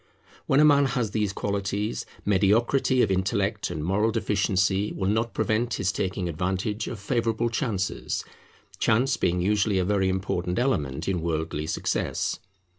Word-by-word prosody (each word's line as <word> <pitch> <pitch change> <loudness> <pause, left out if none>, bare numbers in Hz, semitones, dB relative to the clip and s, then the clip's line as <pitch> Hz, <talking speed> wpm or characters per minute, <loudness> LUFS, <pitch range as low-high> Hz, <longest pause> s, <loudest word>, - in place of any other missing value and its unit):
When 135 - +4
a 150 - +7
man 145 -1 +5
has 125 -5 -1
these 105 -2 0
qualities, 100 +2 -2 0.2
mediocrity 115 +6 +3
of 95 - +1
intellect 100 +3 0
and 80 -3 -4
moral 100 +5 +2
deficiency 100 -2 +1
will 95 - -2
not 115 +2 -1
prevent 115 +2 0
his 95 -1 0
taking 95 -1 -2
advantage 95 +6 -2
of 115 - -5
favourable 115 +1 0
chances; 110 -7 -2 0.5
chance 125 +4 +2
being 90 +1 0
usually 100 +1 +2
a 90 - +1
very 95 -1 +1
important 90 -1 -2
element 75 - 0
in 90 -3 0
worldly 80 -2 -2
success. - - -1
100 Hz, 145 wpm, -26 LUFS, 95-115 Hz, 0.5 s, a